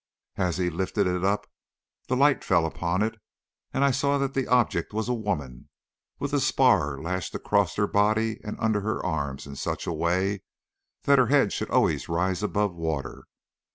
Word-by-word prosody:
As 90 -3 0
he 90 -1 0
lifted 90 +3 -1
it 90 0 -1
up 100 +2 +1 0.6
the 130 - 0
light 140 +2 +3
fell 85 -4 +3
upon 85 +4 -1
it, 110 0 -3 0.5
and 135 - 0
I 140 - +4
saw 140 +2 +1
that 135 -1 -1
the 135 -1 -1
object 125 -3 +1
was 110 +1 -2
a 125 - +1
woman, 90 - -4 0.5
with 140 +1 -4
a 145 - +3
spar 125 - +3
lashed 90 +3 -4
across - - +1
her 105 - +2
body 110 +2 +1
and 105 - -5
under 110 -2 +1
her 110 +2 -2
arms 70 -4 -2
in 70 -1 -9
such - - -3
a - - -2
way 95 +3 0 0.6
that - - +5
her - - +4
head - - +3
should - - -3
always - - +1
rise 90 +3 0
above 105 -2 0
water. 80 -4 -4
100 Hz, 185 wpm, -26 LUFS, 85-115 Hz, 0.6 s, that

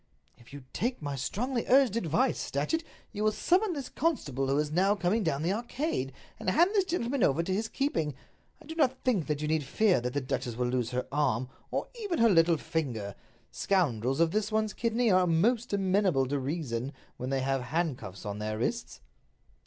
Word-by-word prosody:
"If 120 - -18
you 140 -1 -9
take 245 +3 -1
my 145 -2 -4
strongly 235 - -2
urged 260 -4 +5
advice, 165 -8 0
Datchet, 150 - -1 0.3
you 210 - -3
will 215 - +4
summon 365 - +2
this 280 -5 -4
constable 145 - -1
who 135 +1 +1
is 150 0 0
now 190 +5 +3
coming 200 +3 +1
down 155 -6 -1
the 175 +4 +1
Arcade, 235 - -2 0.3
and - - -1
hand 345 - +4
this 395 -3 +3
gentleman 275 -7 -1
over 155 +1 +3
to 185 +2 -2
his 215 +4 -1
keeping. 165 - -1 0.4
I 320 - -16
do 320 - -6
not 265 -5 +1
think 220 - +1
that 150 0 -1
you - - -1
need 155 -1 +1
fear 190 - +2
that 125 +1 -3
the 145 - +1
duchess 125 -3 -3
will 125 +1 0
lose 125 -2 0
her 125 0 -2
arm, 130 -4 0 0.2
or - - -2
even 390 -6 -1
her 230 0 +5
little 165 -3 +5
finger. 135 - -3 0.4
Scoundrels 135 - +1
of 165 -1 +3
this 215 +2 0
one's 215 -1 0
kidney 230 -1 +1
are 185 -1 +4
most 225 +9 +2
amenable 190 -7 +2
to 140 0 0
reason 135 -3 -3 0.2
when 125 - -4
they 135 -1 0
have 135 0 0
handcuffs 125 - -3
on 105 0 -4
their 110 0 -3
wrists." 115 - -3
170 Hz, 200 wpm, -29 LUFS, -, 0.4 s, urged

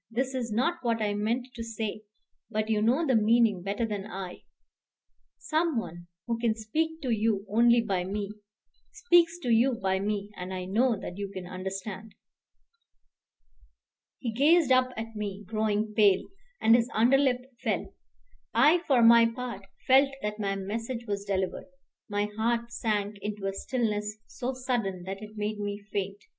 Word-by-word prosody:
This 255 +3 -1
is 245 -3 -3
not 265 +11 +1
what 230 -2 0
I 210 -1 0
meant 230 +5 -1
to 230 - -6
say; 220 -2 -4 0.5
but 215 +1 -1
you 210 -1 +2
know 255 +9 +3
the 265 -4 +3
meaning 220 -3 +4
better 200 +5 -1
than 205 -2 -4
I. 190 -4 -7 1.0
Some 320 -2 0
one 175 -5 -5 0.2
who 230 -1 -2
can 230 -2 +1
speak 320 +9 -2
to 255 - -1
you 215 -2 +1
only 235 +3 +4
by 195 -5 -1
me 200 +2 -3 0.6
speaks 345 -5 +3
to 245 - -1
you 240 +4 +4
by 190 -3 0
me; 205 0 -2
and 185 +1 -5
I 185 0 -4
know 225 +5 +2
that 180 0 -7
you 200 -1 -4 0.2
understand." 190 +3 -6 2.0
He 235 -4 -4
gazed 300 +4 +4
up 255 0 +5
at 225 0 -6
me, 205 -1 -4
growing 215 0 -1
pale, 205 -3 +4 0.4
and 225 +1 +6
his 240 +1 +2
underlip 250 +2 +3
fell. - - -2 0.6
I, 295 +9 +6
for 255 -4 +4
my 230 0 +8
part, 230 -4 -6 0.2
felt 270 +2 +6
that 210 0 -3
my 195 -1 -1
message 225 +5 -4
was 200 -2 -3
delivered. 190 +4 -2 0.4
My 205 0 0
heart 230 +3 -1
sank 210 -3 -2
into 205 -1 -5
a 195 - -1
stillness 210 -2 -2
so 255 +1 -4
sudden 235 -8 -2
that 195 +2 -6
it 215 0 -10
made 210 0 -2
me 205 0 -3 0.2
faint. 200 0 -3
220 Hz, 160 wpm, -28 LUFS, 205-240 Hz, 2.0 s, my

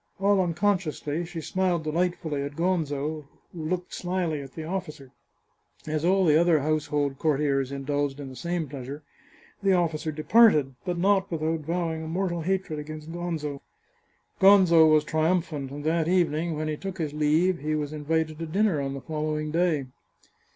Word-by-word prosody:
All 200 0 +3
unconsciously, 175 -3 -1
she 165 -1 -6
smiled 180 -1 0
delightfully 160 -2 -1
at 140 +1 -5
Gonzo, 155 -4 -1 0.3
who 165 -3 -6
looked 180 +2 -3
slyly 175 -4 -2
at 135 -1 -11
the 160 - -6
officer. 155 -6 -5 0.7
As 155 0 -2
all 190 +2 +3
the 155 0 +5
other 170 -3 +3
household 145 -2 -1
cour 155 -3 +2
tiers 135 -2 0
indulged 140 0 -2
in 140 - -6
the 130 - -9
same 170 +1 -2
pleasure, 140 +2 -7 0.6
the 195 -1 +3
officer 165 -3 0
departed, 155 - +4
but 180 -2 -2
not 195 +2 +2
without 160 0 -1
vowing 165 +1 -2
a 160 - -6
mortal 175 0 -1
hatred 185 -3 -1
against 155 +1 -8
Gonzo. 160 -5 -4 0.8
Gonzo 185 -5 +7
was 155 -1 +5
triumphant, 155 -3 0
and 145 +2 -7
that 160 +1 +1
evening 170 -2 +1
when 155 0 -2
he 155 -1 -2
took 190 +2 -6
his 155 -4 -3
leave 155 +4 +2
he 155 +1 -1
was 150 -1 -3
invited 155 +1 -1
to 165 - -4
dinner 185 -2 +1
on 135 0 -3
the 135 - -6
following 155 0 -3
day. 165 -4 +1
160 Hz, 165 wpm, -26 LUFS, 150-175 Hz, 0.8 s, Gonzo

